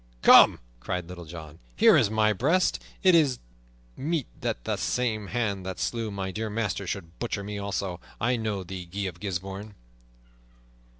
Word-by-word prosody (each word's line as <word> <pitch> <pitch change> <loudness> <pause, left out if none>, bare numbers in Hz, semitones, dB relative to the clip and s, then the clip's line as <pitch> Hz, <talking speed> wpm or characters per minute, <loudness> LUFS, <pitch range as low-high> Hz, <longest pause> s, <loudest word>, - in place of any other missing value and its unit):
"Come!" - - +8 0.2
cried 90 +7 -3
Little 90 -1 -9
John. 80 -1 -10 0.2
"Here - - +6
is - - +4
my 110 0 +3
breast. 155 - +1 0.2
It 185 -1 +6
is 145 -7 +4 0.6
meet 155 -2 -1 0.2
that - - -2
the - - -1
same 110 -5 -1
hand 105 -4 -1
that 95 0 -5
slew 115 -2 -2
my 95 -2 -4
dear 110 +3 -3
master 105 -3 -2
should 85 -2 -6
butcher 115 -4 -3
me 105 0 -5
also! 100 -3 -3 0.2
I 120 +3 +2
know 110 -4 -2
thee, 90 0 -7
Guy 95 +4 -5
of 90 -3 -4
Gisbourne!" 100 +2 -5
100 Hz, 165 wpm, -27 LUFS, 90-115 Hz, 0.6 s, Come